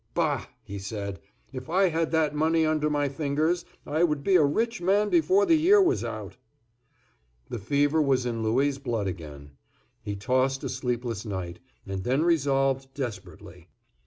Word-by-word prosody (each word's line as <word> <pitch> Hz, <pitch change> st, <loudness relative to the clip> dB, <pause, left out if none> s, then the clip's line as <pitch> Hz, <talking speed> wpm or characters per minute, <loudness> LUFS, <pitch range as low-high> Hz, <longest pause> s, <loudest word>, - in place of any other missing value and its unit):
"Bah!" -, -, 0 dB, 0.2 s
he 100 Hz, 0 st, -7 dB
said. 100 Hz, -1 st, -5 dB, 0.3 s
"If 130 Hz, +1 st, -7 dB
I 185 Hz, +2 st, +3 dB
had 165 Hz, 0 st, 0 dB
that 155 Hz, -2 st, +1 dB
money 160 Hz, +2 st, +2 dB
under 155 Hz, -1 st, +1 dB
my 145 Hz, -1 st, +1 dB
fingers, 155 Hz, +5 st, -1 dB, 0.2 s
I 155 Hz, +3 st, 0 dB
would 150 Hz, -4 st, +1 dB
be 195 Hz, -, +3 dB
a 165 Hz, -, +6 dB
rich 225 Hz, +10 st, 0 dB
man 200 Hz, +4 st, +2 dB
before 375 Hz, +4 st, +4 dB
the 335 Hz, -, +4 dB
year 350 Hz, +6 st, +5 dB
was 380 Hz, 0 st, +2 dB
out." -, -, -6 dB, 1.1 s
The 120 Hz, -, -3 dB
fever 145 Hz, +8 st, +2 dB
was 135 Hz, -3 st, +1 dB
in 115 Hz, -2 st, -2 dB
Louis' 135 Hz, +5 st, +1 dB
blood 120 Hz, -6 st, -2 dB
again. 75 Hz, -6 st, -7 dB, 0.5 s
He 100 Hz, -, -4 dB
tossed 130 Hz, +6 st, 0 dB
a -, -, -3 dB
sleepless 125 Hz, -4 st, -3 dB
night, 95 Hz, -5 st, -5 dB, 0.3 s
and 95 Hz, -1 st, -4 dB
then 130 Hz, +7 st, +1 dB
resolved 135 Hz, -5 st, +1 dB
desperately. 95 Hz, -, -7 dB
140 Hz, 160 wpm, -27 LUFS, 110-160 Hz, 1.1 s, a